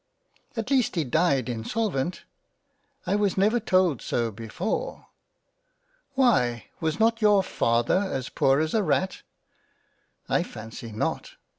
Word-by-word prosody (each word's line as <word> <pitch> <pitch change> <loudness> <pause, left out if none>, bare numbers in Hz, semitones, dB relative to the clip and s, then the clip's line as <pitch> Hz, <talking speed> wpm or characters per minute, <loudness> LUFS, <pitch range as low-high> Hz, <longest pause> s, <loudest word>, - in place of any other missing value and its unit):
" - - -32
At 225 +4 -3
least 255 -7 +2
he 165 - +1
died 140 -2 +1
insolvent 135 - -2 0.3
?" 280 -1 -48
" 285 -1 -40
I 190 +2 +1
was 205 -2 +1
never 215 +5 +3
told 185 - +2
so 115 -1 -1
before." 175 - -4 0.5
" - - -43
Why, 125 - +2
was 160 -1 -1
not 225 +1 +3
your 205 -2 +5
Father 120 +1 +1
as 130 -1 -3
poor 135 +1 +2
as 160 0 -1
a 220 - +3
Rat? 190 -1 0 0.4
" - - -41
" - - -44
I - - +2
fancy 115 +2 -8
not." 105 - -3
185 Hz, 155 wpm, -26 LUFS, -, 0.5 s, your